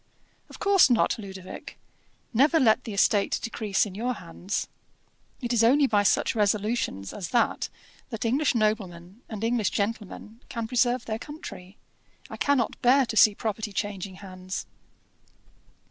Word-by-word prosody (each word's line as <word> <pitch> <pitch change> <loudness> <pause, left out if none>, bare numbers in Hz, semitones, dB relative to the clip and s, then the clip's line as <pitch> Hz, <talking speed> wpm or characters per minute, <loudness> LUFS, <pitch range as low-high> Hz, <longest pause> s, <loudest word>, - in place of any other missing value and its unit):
"Of - - -11
course 400 -7 +5
not, 235 -1 +2
Ludovic. 190 -2 -9 0.6
Never 290 +8 +4
let 250 -2 +3
the 220 - -5
estate 200 0 +2
decrease 215 -3 0
in 200 - -8
your 240 +5 -2
hands. 180 +2 -4 0.7
It 240 -1 -2
is 230 -1 +3
only 275 +5 +5
by 210 -5 +3
such 205 - +2
resolutions 210 - -1
as 195 -4 -5
that 240 - +1 0.4
that 225 -1 -4
English 265 +4 +2
noblemen 200 -3 -2
and 215 -1 -6
English 230 -3 +1
gentlemen 215 +1 -4
can 230 -2 -4
preserve 245 0 +1
their 220 0 -3
country. 205 -10 -10 0.5
I - - -6
cannot 280 -5 +1
bear 260 +2 +5
to 230 - -5
see 215 -1 +6
property 215 0 -3
changing 195 -2 -4
hands." 185 -1 -7
220 Hz, 145 wpm, -26 LUFS, 200-240 Hz, 0.7 s, see